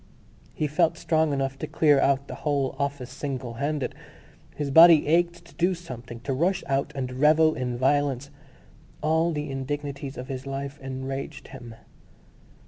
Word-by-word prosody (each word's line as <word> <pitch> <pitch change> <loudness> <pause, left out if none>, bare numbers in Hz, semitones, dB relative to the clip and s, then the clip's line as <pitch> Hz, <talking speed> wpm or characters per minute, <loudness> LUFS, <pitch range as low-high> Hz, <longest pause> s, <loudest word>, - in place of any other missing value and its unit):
He 155 - -1
felt 165 +2 +1
strong 160 -2 +1
enough 135 -1 -2
to - - -4
clear 145 -3 +4
out 140 0 +2
the - - -7
whole 140 -3 0
office 140 -3 -3
singlehanded. 135 +1 -3 0.6
His 145 -2 -3
body 165 +1 +8
ached 170 +2 +1
to - - -17
do 180 +2 +1
something, 125 -8 -9
to 135 +2 -2
rush 180 +7 +1
out 140 +1 -1
and 130 -1 -4
revel 155 +2 +5
in 125 -3 -3
violence. 140 +1 +1 0.7
All 160 +2 +2
the 150 -3 -3
indignities 140 0 -4
of 125 - -6
his 130 0 -6
life 140 +1 -5
enraged 135 +1 -6
him.... 120 -4 -10
140 Hz, 150 wpm, -26 LUFS, 135-155 Hz, 0.7 s, body